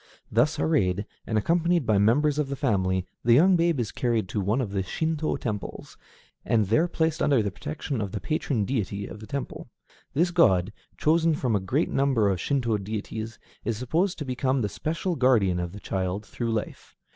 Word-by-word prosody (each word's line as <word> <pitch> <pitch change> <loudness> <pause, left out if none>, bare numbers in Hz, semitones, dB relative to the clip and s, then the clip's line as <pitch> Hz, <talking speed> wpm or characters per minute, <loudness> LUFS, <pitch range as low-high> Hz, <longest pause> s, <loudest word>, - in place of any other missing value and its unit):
Thus - - +2
arrayed, 90 +5 +1 0.2
and 110 - 0
accompanied 170 +5 +2
by 110 -3 +3
members 145 +8 +3
of 145 -2 0
the 140 - -2
family, 95 -8 0 0.2
the 115 0 +5
young 180 +7 +6
baby 165 -5 +2
is 110 - -3
carried 115 -5 0
to 105 - -1
one 105 +6 +1
of 115 -7 -2
the 100 -1 0
Shinto 155 - -1
temples, 105 -4 -5 0.5
and 110 -3 +2
there 135 - +2
placed 160 -2 -1
under 135 -6 +3
the 100 - -2
protection 110 - -4
of 100 -2 -3
the 105 - -3
patron 135 - -1
deity 100 -4 -2
of - - -9
the 110 - -10
temple. 140 -2 -5 0.5
This 175 +4 +2
god, 100 - +3 0.2
chosen 165 +1 +3
from 125 -6 0
a - - +2
great 130 - 0
number 130 -7 +2
of 90 -3 -2
Shinto 120 -7 0
deities, 110 +2 -5 0.3
is 115 -2 -2
supposed 165 - 0
to 150 - -5
become 130 +1 0
the 105 - -1
special 165 - -2
guardian 115 - +3
of 85 -1 -3
the 105 - -9
child 95 +1 -3
through 115 +3 -3
life. 110 -1 -5
115 Hz, 190 wpm, -26 LUFS, 100-150 Hz, 0.5 s, young